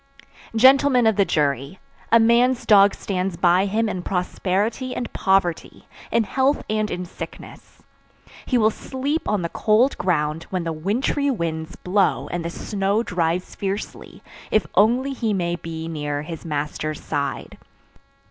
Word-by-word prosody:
"Gentlemen 260 +1 +5
of 220 -1 +4
the 200 -1 +3
jury, 140 +1 -1 0.3
A 230 - +7
man's 235 +2 +3
dog 200 -2 +6
stands 185 -2 -3
by 180 +3 +3
him 220 +3 0
in 185 -4 -3
prosperity 195 +7 -2
and 240 - -5
poverty, 190 -3 0 0.2
in 230 0 +3
health 265 +6 +1
and 215 -1 0
in 180 0 -4
sickness. 175 - -11 0.6
He 255 - +2
will 220 -1 +4
sleep 275 +7 -3
on 205 -4 0
the 170 - -2
cold 225 +9 +2
ground, 160 -3 -1
when 185 -2 -2
the 165 -1 -3
wintry 230 - 0
winds 165 - -3
blow 190 +2 0
and 175 -1 -3
the 170 - -3
snow 200 +4 -1
drives 175 -2 -1
fiercely, 200 +1 -5 0.3
if 215 - +2
only 245 +8 +3
he 230 -5 -1
may 175 -2 -1
be 165 -1 -6
near 145 -2 -3
his 165 +1 -8
master's 150 0 -3
side. - - -4
195 Hz, 150 wpm, -22 LUFS, 170-230 Hz, 0.6 s, A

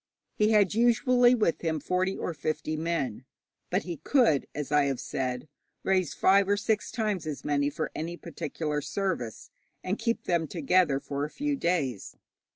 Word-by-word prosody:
He 210 0 +2
had 210 -3 +4
usually 240 +2 +4
with 210 -8 +1
him 160 -2 -1
forty 185 +5 0
or 175 - -3
fifty 155 +1 -2
men, 155 -8 -2 0.5
but 185 +3 0
he 175 -2 -5
could, 160 - +2
as 150 0 -4
I 145 -1 +4
have 135 -2 -1
said, 130 +1 -3 0.4
raise 185 -4 +1
five 195 +1 +4
or 205 - +3
six 215 0 0
times 210 -8 -2
as 150 -3 -5
many 145 -1 +1
for 145 - -4
any 170 +2 -4
particular 155 -2 -4
service, 155 - -3 0.3
and 190 +3 -2
keep 230 0 -1
them 170 -2 0
together 160 -1 +2
for 140 0 -4
a 150 - -2
few 290 - -2
days. 160 - -1
170 Hz, 165 wpm, -28 LUFS, 145-200 Hz, 0.5 s, had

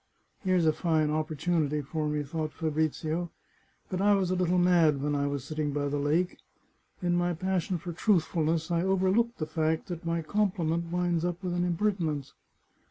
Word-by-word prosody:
" - - -44
Here's 185 -3 +2
a 155 - +4
fine 155 -3 +1
opportunity 155 -1 0
for 155 +2 -2
me," 150 0 -1
thought 155 +1 -4
Fabrizio. 160 +2 -1 0.3
" - - -39
But 185 0 -1
I 205 0 +5
was 190 -2 0
a - - +2
little 180 0 +1
mad 170 -5 +4
when 145 +2 -1
I 140 0 +1
was 140 -2 -3
sitting 150 0 -2
by 145 0 -1
the 145 0 -1
lake. 160 +6 0 0.6
In 175 0 +2
my 175 0 +1
passion 185 0 -1
for 175 +1 -6
truthfulness 165 -3 +1
I 170 -1 +2
overlooked 190 +5 +2
the 155 - -2
fact 160 +3 -1
that 170 -2 -5
my 165 0 -1
compliment 170 -4 0
winds 175 -2 0
up 175 +1 -2
with 180 -1 -2
an 175 0 0
impertinence. 170 -6 -1
165 Hz, 185 wpm, -29 LUFS, 155-180 Hz, 0.6 s, I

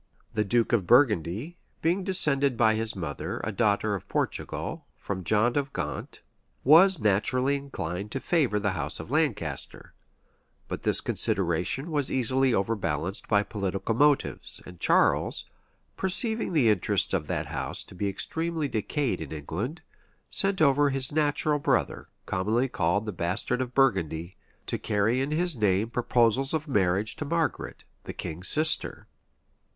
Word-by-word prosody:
The 105 - +1
duke 115 +3 +1
of 100 -7 +1
Burgundy, 120 - +2 0.3
being 175 +4 +1
descended 140 - +1
by 110 -1 +4
his 110 0 +1
mother, 80 -6 -5
a 105 - -2
daughter 105 0 +1
of 100 - -5
Portugal, - - -3
from 95 -2 -5
John 110 +6 +2
of 140 -1 -1
Gaunt, - - -5 0.4
was 170 +5 +6
naturally 125 +7 +2
inclined 105 -9 -5
to 135 - -2
favor 135 -10 +1
the 100 -1 0
house 75 -5 -3
of - - -8
Lancaster:[*] 120 - -2 0.7
but - - -5
this - - +3
consideration 90 - -1
was 145 -3 0
easily 130 +1 +2
overbalanced 95 -5 -2
by 105 -1 +3
political 100 0 -3
motives; 145 +4 +1
and 90 -1 -12
Charles, - - +2 0.5
perceiving 220 +2 -1
the 135 -8 +4
interests 100 -4 0
of - - -1
that - - -2
house - - -4
to - - -15
be 100 +2 -2
extremely 160 - -3
decayed 120 - -2
in 80 - -7
England, 90 - -5 0.5
sent 195 -4 +4
over 145 0 +4
his 135 -1 +2
natural 150 0 +1
brother, - - 0 0.2
commonly 110 +7 0
called 100 -1 0
the 105 - -3
Bastard 90 +7 -2
of 125 -1 -5
Burgundy, 95 - +1 0.3
to - - -3
carry 110 +5 +1
in 135 - -1
his 170 +1 +2
name 105 0 +1
proposals 125 +3 +2
of 155 0 -3
marriage 100 -4 +1
to - - -3
Margaret, 165 +2 -2 0.2
the - - -6
king's 85 +3 -1
sister. 155 0 +2
115 Hz, 145 wpm, -27 LUFS, 100-145 Hz, 0.7 s, was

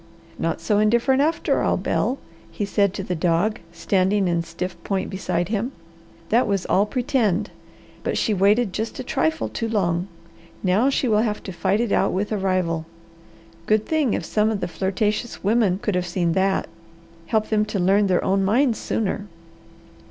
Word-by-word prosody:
"Not 165 0 -1
so 205 +5 +1
indifferent 235 +5 +3
after 320 +3 +1
all, - - +1
Bel," 260 - 0 0.3
he 205 - -3
said 200 -1 +2
to 195 - -3
the 180 - -3
dog 175 +5 +1
standing 190 +3 +1
in 170 -1 +1
stiff 170 +2 -5
point 195 -2 -2
beside 185 -2 -2
him. 230 +5 -2 0.6
"That 235 +2 +3
was 200 -3 0
all 200 +3 +2
'pretend!' 225 -6 0 0.5
But - - -1
she 220 - +1
waited 200 +2 +3
just 220 +1 -3
a 260 - -4
trifle 315 +5 0
too 230 - -3
long. 180 -4 0 0.6
Now 200 +8 +3
she 270 -1 0
will 215 -2 +3
have 215 -2 -2
to 190 - -6
fight 195 +3 0
it 235 -3 -1
out - - +2
with 200 +3 -1
a 215 - 0
rival. 180 -4 0 0.8
Good 215 0 +2
thing 305 -7 +1
if - - -3
some 215 0 +1
of 215 -2 -1
the - - -2
flirtatious 205 +6 -2
women 205 -3 +2
could 210 - -1
have 180 -1 -1
seen 175 -1 0
that. 190 +2 +1 0.6
Help 220 -2 0
them 215 -1 +2
to 215 -1 -3
learn 195 +3 +3
their 185 -2 +2
own 195 +1 +2
minds 230 +4 +2
sooner." 205 -1 -2
205 Hz, 180 wpm, -23 LUFS, 185-220 Hz, 0.8 s, indifferent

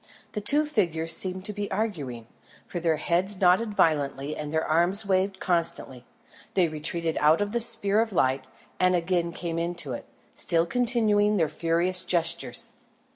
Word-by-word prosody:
The 210 - -5
two 295 +8 +1
figures 165 - 0
seemed 185 0 0
to 210 - -4
be 205 0 -5
arguing, 145 - -4 0.4
for 175 - -6
their 165 -1 0
heads 180 +5 -1
nodded 200 +4 +2
violently 145 -3 0
and 150 -1 -6
their 160 0 -1
arms 175 +6 +1
waved 190 0 0
constantly. 165 -8 0 0.5
They 180 -3 +3
retreated 160 +1 0
out 155 +2 +4
of 205 0 -2
the 235 - -1
sphere 220 -3 +5
of 225 -1 -3
light, 130 -6 0 0.3
and 185 0 +3
again 170 0 -1
came 165 -1 -5
into 170 -6 -3
it, - - -8 0.3
still 165 0 +2
continuing 215 -2 +1
their 165 -4 +1
furious 170 +2 +2
gestures. 165 -2 -2
175 Hz, 160 wpm, -25 LUFS, 160-205 Hz, 0.5 s, sphere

